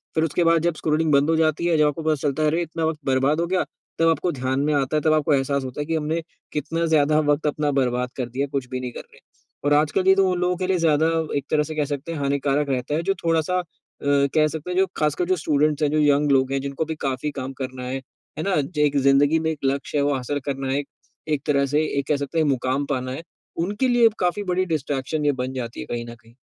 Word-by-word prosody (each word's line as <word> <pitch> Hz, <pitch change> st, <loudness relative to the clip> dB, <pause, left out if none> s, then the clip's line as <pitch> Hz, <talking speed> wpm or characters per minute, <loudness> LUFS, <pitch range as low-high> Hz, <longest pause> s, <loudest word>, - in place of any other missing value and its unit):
फिर 160 Hz, -, +2 dB
उसके 165 Hz, +2 st, +1 dB
बाद 165 Hz, -1 st, +4 dB
जब 170 Hz, -2 st, +1 dB
स्क्रॉल 155 Hz, +1 st, 0 dB
बंद 140 Hz, +2 st, +4 dB
हो 165 Hz, -, +3 dB
जाती 160 Hz, +1 st, +1 dB
है, 165 Hz, -2 st, +3 dB
जब 150 Hz, -1 st, +4 dB
आपको 150 Hz, +2 st, -3 dB
पता 155 Hz, -1 st, +2 dB
चलता 145 Hz, +1 st, -1 dB
है, -, -, +3 dB
"अरे! 165 Hz, +3 st, 0 dB
इतना 165 Hz, -1 st, -3 dB
वक़्त 160 Hz, -1 st, -1 dB
बर्बाद 135 Hz, +4 st, +2 dB
हो -, -, +1 dB
गया।" 185 Hz, 0 st, +1 dB, 0.4 s
तब 165 Hz, -, +4 dB
आपको 170 Hz, +2 st, +1 dB
ध्यान 130 Hz, 0 st, -2 dB
में 150 Hz, +1 st, +1 dB
आता 140 Hz, +1 st, +1 dB
है, -, -, 0 dB
तब 155 Hz, 0 st, +3 dB
आपको 155 Hz, -1 st, +2 dB
एहसास 140 Hz, 0 st, +1 dB
होता 130 Hz, +3 st, -5 dB
है -, -, -3 dB
कि 165 Hz, +1 st, -1 dB
हमने 160 Hz, +2 st, -1 dB, 0.3 s
कितना 165 Hz, +3 st, -1 dB
ज़्यादा 155 Hz, -1 st, +3 dB
वक़्त 150 Hz, +1 st, 0 dB
अपना 150 Hz, 0 st, 0 dB
बर्बाद 125 Hz, -1 st, 0 dB
कर 125 Hz, -2 st, -3 dB
दिया, 135 Hz, +4 st, -2 dB
कुछ 135 Hz, -2 st, -3 dB
भी 130 Hz, -1 st, -3 dB
नहीं 125 Hz, -1 st, -5 dB
कर -, -, -8 dB
रहे -, -, -22 dB
हैं। -, -, -21 dB, 0.4 s
और 145 Hz, -, +3 dB
आजकल 155 Hz, +6 st, +2 dB
ये 190 Hz, -, +7 dB
तो 195 Hz, -1 st, +3 dB
उन 180 Hz, -, -1 dB
लोगों 180 Hz, 0 st, 0 dB
के 185 Hz, 0 st, -2 dB
लिए 190 Hz, -1 st, +2 dB
ज़्यादा 160 Hz, -1 st, +3 dB, 0.3 s
एक 140 Hz, -, -3 dB
तरह 150 Hz, -1 st, +3 dB
से 155 Hz, +1 st, -6 dB
कह 150 Hz, -1 st, +1 dB
सकते 145 Hz, +3 st, -5 dB
हैं, 160 Hz, -, -4 dB
हानिकारक 140 Hz, +1 st, 0 dB
रहता 130 Hz, +3 st, -1 dB
है, 165 Hz, -, -1 dB
जो 195 Hz, -, +1 dB
थोड़ा-सा 165 Hz, +2 st, +1 dB, 0.4 s
अ, -, -, -8 dB, 0.3 s
कह 155 Hz, 0 st, +5 dB
सकते 160 Hz, +2 st, -6 dB
हैं, 180 Hz, -, -2 dB
जो 190 Hz, -, +5 dB
खासकर 150 Hz, +3 st, +1 dB
जो 185 Hz, -, +3 dB
स्टूडेंट्स 150 Hz, 0 st, +1 dB
हैं, 145 Hz, -, +3 dB
जो 155 Hz, -, +2 dB
यंग 145 Hz, 0 st, +3 dB
लोग 130 Hz, 0 st, +3 dB
हैं, 135 Hz, -, +1 dB
जिनको 140 Hz, +3 st, -3 dB
अभी 160 Hz, 0 st, -4 dB
काफ़ी 135 Hz, +2 st, -2 dB
काम 130 Hz, +1 st, -5 dB
करना 130 Hz, -1 st, -5 dB
है। 130 Hz, +1 st, -3 dB, 0.4 s
है -, -, -1 dB
ना? 195 Hz, -1 st, +1 dB
ज 150 Hz, +2 st, -6 dB
एक 145 Hz, -1 st, +3 dB
ज़िंदगी 145 Hz, +4 st, +4 dB
में 160 Hz, 0 st, -1 dB
एक 155 Hz, -, -5 dB
लक्ष्य 140 Hz, +2 st, -1 dB
है, -, -, +2 dB
वो 145 Hz, -, +2 dB
हासिल 140 Hz, +3 st, -2 dB
करना 135 Hz, -1 st, -3 dB
है 140 Hz, -, +1 dB
एक, 140 Hz, -, -6 dB, 0.4 s
एक 150 Hz, -3 st, 0 dB
तरह 140 Hz, -1 st, +3 dB
से 155 Hz, -, +4 dB, 0.2 s
एक 135 Hz, -, -4 dB
कह 150 Hz, -, +3 dB
सकते 140 Hz, +3 st, -4 dB
हैं, 155 Hz, -, +3 dB
मुकाम 135 Hz, +1 st, 0 dB
पाना 130 Hz, -1 st, -2 dB
है। 160 Hz, -, -6 dB, 0.4 s
उनके 210 Hz, +7 st, 0 dB
लिए 240 Hz, -1 st, +4 dB
अब 215 Hz, -, -1 dB
काफ़ी 180 Hz, +3 st, 0 dB
बड़ी 185 Hz, +1 st, +1 dB
डिस्ट्रैक्शन 150 Hz, -2 st, -2 dB
ये 145 Hz, -, +4 dB
बन 130 Hz, -, -4 dB
जाती 120 Hz, -3 st, -5 dB
है -, -, -5 dB
कहीं 120 Hz, 0 st, -3 dB
न -, -, -10 dB
कहीं। 115 Hz, 0 st, -21 dB
150 Hz, 275 wpm, -23 LUFS, 135-160 Hz, 0.4 s, ये